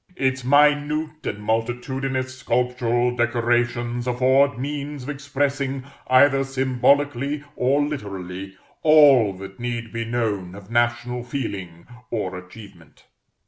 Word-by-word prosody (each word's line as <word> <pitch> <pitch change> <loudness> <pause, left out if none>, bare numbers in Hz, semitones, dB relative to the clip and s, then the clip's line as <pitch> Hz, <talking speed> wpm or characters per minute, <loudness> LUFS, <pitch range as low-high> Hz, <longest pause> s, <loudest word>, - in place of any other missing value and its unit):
Its 130 -3 0
minute 150 +3 +2
and 105 +1 -4
multitudinous 130 +4 -2
sculptural 125 -1 0
decorations 120 0 0
afford 130 +1 +3
means 145 +1 -4
of 130 - -7
expressing, 140 -1 -2 0.2
either 135 +1 +5
symbolically 135 +2 +1
or 140 +3 +2
literally, 95 -8 -6 0.2
all 145 -8 +6
that 95 +2 -10
need 120 -1 -4
be 115 0 -2
known 110 -6 -2
of 100 +1 -12
national 120 +1 0
feeling 100 -10 -5 0.2
or 95 -5 -3
achievement. 90 -2 -13
125 Hz, 105 wpm, -23 LUFS, 115-140 Hz, 0.2 s, all